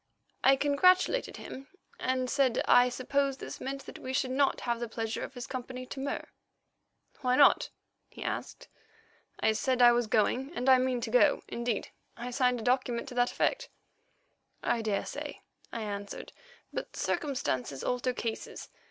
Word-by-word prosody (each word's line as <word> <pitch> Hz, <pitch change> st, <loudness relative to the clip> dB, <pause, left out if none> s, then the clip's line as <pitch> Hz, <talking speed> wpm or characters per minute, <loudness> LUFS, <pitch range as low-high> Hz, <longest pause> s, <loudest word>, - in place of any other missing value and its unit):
I 270 Hz, -, +7 dB
congratulated 365 Hz, -, +3 dB
him 270 Hz, +1 st, -9 dB, 0.3 s
and 255 Hz, 0 st, 0 dB
said 265 Hz, -2 st, +2 dB
I 245 Hz, 0 st, +6 dB
supposed 270 Hz, +2 st, 0 dB
this -, -, -7 dB
meant 275 Hz, +1 st, -5 dB
that -, -, -9 dB
we 260 Hz, -, -5 dB
should 260 Hz, -1 st, 0 dB
not 275 Hz, +1 st, +2 dB
have 235 Hz, -1 st, -1 dB
the 235 Hz, -, -3 dB
pleasure 225 Hz, 0 st, -3 dB
of -, -, -6 dB
his 245 Hz, -, -5 dB
company 255 Hz, 0 st, -6 dB
to 265 Hz, -, -7 dB
Mur. 280 Hz, +1 st, -3 dB, 0.9 s
"Why 250 Hz, -2 st, +2 dB
not?" 280 Hz, +1 st, +5 dB, 0.4 s
he -, -, -9 dB
asked. -, -, -4 dB, 0.7 s
"I 220 Hz, -, +4 dB
said 250 Hz, +3 st, 0 dB
I 240 Hz, -1 st, +8 dB
was 240 Hz, -1 st, +1 dB
going 245 Hz, +6 st, +1 dB
and 250 Hz, -, -2 dB
I 260 Hz, -1 st, +7 dB
mean 255 Hz, -1 st, 0 dB
to 225 Hz, -, -4 dB
go; 265 Hz, +4 st, +4 dB
indeed, 235 Hz, -2 st, -2 dB, 0.3 s
I 245 Hz, +1 st, -5 dB
signed 250 Hz, -1 st, +2 dB
a -, -, -6 dB
document 250 Hz, 0 st, 0 dB
to -, -, -8 dB
that 245 Hz, 0 st, +2 dB
effect." -, -, 0 dB, 0.9 s
"I 235 Hz, -, +1 dB
daresay," 215 Hz, -3 st, -3 dB, 0.3 s
I 230 Hz, -, -4 dB
answered, 205 Hz, -1 st, -6 dB, 0.4 s
"but -, -, -5 dB
circumstances 140 Hz, -, -2 dB
alter 250 Hz, 0 st, 0 dB
cases. 230 Hz, -2 st, -5 dB
250 Hz, 160 wpm, -30 LUFS, 235-270 Hz, 0.9 s, I